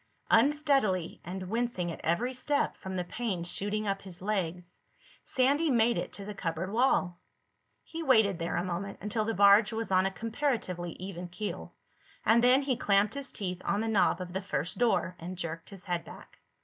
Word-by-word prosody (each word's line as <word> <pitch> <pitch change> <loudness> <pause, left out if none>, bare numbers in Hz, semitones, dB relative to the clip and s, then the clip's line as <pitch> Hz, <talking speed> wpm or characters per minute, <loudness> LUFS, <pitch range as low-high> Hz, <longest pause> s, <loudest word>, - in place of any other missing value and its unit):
Unsteadily, 270 - +2
and 185 +1 -6
wincing 225 -5 -1
at - - -8
every 235 +11 0
step 285 +3 0
from 190 0 -7
the 180 - -1
pains 185 -3 -3
shooting 210 +1 -1
up 195 0 -1
his 180 -3 -10
legs, 180 -3 -3 0.5
Sandy 280 +5 +2
made 235 -2 +3
it - - -3
to 200 - -6
the 210 - -5
cupboard 175 -1 -3
wall. 210 -7 +2 0.6
He 330 - -7
waited 220 - +4
there 165 - -2
a - - 0
moment, 185 +2 -4
until 215 +1 -1
the 225 0 -1
barge 200 +2 +6
was 225 -2 -3
on 185 0 +4
a - - -3
comparatively 220 - -2
even 180 -1 -7
keel, 205 +4 -6 0.5
and 230 +2 +5
then 255 +3 +5
he 270 -2 +1
clamped 200 +1 +2
his 280 0 -3
teeth 185 -3 -4
on 200 - 0
the 225 - -1
knob 210 -3 +3
of 180 -1 -6
the 190 - -2
first 170 -4 -2
door 225 -6 +2
and 180 +2 -6
jerked 165 -1 -5
his 195 -3 -11
head 175 -3 -2
back. - - -13
200 Hz, 190 wpm, -30 LUFS, 180-230 Hz, 0.6 s, barge